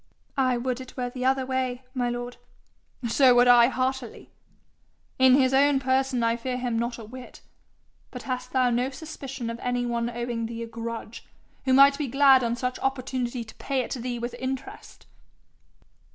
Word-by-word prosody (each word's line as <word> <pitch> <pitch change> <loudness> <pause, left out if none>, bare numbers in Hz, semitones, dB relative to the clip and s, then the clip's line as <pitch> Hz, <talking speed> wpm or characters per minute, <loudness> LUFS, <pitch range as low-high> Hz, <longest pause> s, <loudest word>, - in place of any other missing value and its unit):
'I 255 -2 +2
would 255 +1 -2
it 255 +1 -12
were 245 -1 -2
the 255 0 -4
other 265 0 +2
way, 260 -1 -2
my 245 -2 -1
lord.' 245 0 -5 0.7
'So 250 +2 +5
would 245 0 +5
I 240 -1 +7
heartily. 260 -1 -3 0.9
In 260 0 +7
his 265 -1 +3
own 280 +1 +4
person 260 -1 +1
I 230 0 +1
fear 250 +1 -3
him 245 -2 -1
not 235 0 -2
a 230 - -9
whit. 255 +3 -11 0.7
But 250 - -9
hast 255 -1 -4
thou 255 -2 +2
no 245 +2 0
suspicion 275 -4 -7
of 230 - -7
any 245 0 -1
one 235 0 -1
owing 235 -1 -3
thee 230 0 -6
a - - -6
grudge, 230 0 -7 0.4
who 260 - +3
might 280 +2 +6
be 295 - -1
glad 270 0 +5
on 235 0 0
such 250 +1 -3
opportunity 255 -2 -2
to 220 - -13
pay 270 -2 -1
it 245 - -7
thee 245 -1 -4
with 240 +1 -4
interest?' 265 +11 -6
250 Hz, 180 wpm, -26 LUFS, 240-265 Hz, 0.9 s, I